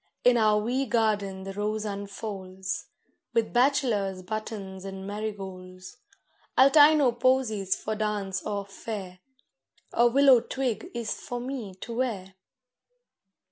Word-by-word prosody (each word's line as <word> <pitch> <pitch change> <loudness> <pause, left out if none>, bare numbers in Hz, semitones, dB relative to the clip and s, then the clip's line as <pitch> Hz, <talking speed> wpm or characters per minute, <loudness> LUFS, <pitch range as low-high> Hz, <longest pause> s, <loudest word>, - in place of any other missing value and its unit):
In 245 0 +6
our 215 -2 +4
wee 250 +6 0
garden 205 -4 0
the 195 0 -6
rose 210 +2 -2
unfolds, 200 -2 -5 0.5
With 230 -1 +1
bachelor's 240 -8 +2
buttons 200 -2 -5
and 195 0 -7
marigolds; 190 -3 -7 0.6
I'll 265 +2 +7
tie 305 +1 +8
no 280 -5 +4
posies 235 -6 +1
for 220 - -4
dance 205 -3 -2
or 205 -2 -3
fair, 195 -2 -7 0.7
A 240 - +5
willow 265 0 +6
twig 240 -2 -3
is 235 -2 -2
for 245 - -6
me 240 -6 -5
to 230 0 -6
wear. 205 -7 -2
215 Hz, 125 wpm, -27 LUFS, 195-240 Hz, 0.7 s, tie